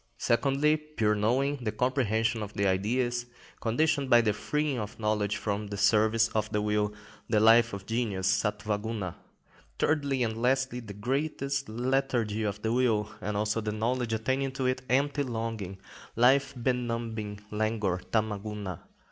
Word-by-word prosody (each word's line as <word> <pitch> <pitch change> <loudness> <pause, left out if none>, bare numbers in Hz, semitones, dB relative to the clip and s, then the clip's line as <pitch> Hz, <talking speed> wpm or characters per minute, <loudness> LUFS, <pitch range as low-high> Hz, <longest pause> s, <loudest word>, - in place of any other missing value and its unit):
Secondly, 140 +6 +2
pure 150 -9 0
knowing, 130 +7 +1
the 120 -5 -3
comprehension 115 -2 +1
of 105 0 -6
the 100 - +1
Ideas, 120 +6 0 0.3
conditioned 140 +3 +1
by 120 -2 +7
the 110 -2 +1
freeing 150 +4 -1
of 105 0 -6
knowledge 105 -2 0
from 105 0 -2
the 100 0 -5
service 110 +2 +4
of 110 -1 -1
will: 105 0 +1 0.4
the 110 -2 +3
life 115 +1 +6
of 100 -1 -7
genius 110 -5 -1
(Satwa 105 0 -1
Guna). 105 -5 -4 0.6
Thirdly 140 -4 +1
and 110 0 -2
lastly, 130 0 +1
the 105 -4 -9
greatest 140 +3 -2
lethargy 120 -2 0
of 105 -1 -3
the 110 +1 +1
will, 115 -4 +2
and 105 0 -2
also 105 +1 0
of 110 - -6
the 105 - 0
knowledge 115 +2 -1
attaching 130 +5 0
to 135 -1 -2
it, 130 0 0
empty 140 +3 +2
longing, 115 -6 -3 0.4
life 135 +4 +4
benumbing 115 -4 -2
languor 105 -4 0
(Tama 110 +1 -1
Guna). 100 -4 -6
115 Hz, 155 wpm, -29 LUFS, 105-130 Hz, 0.6 s, by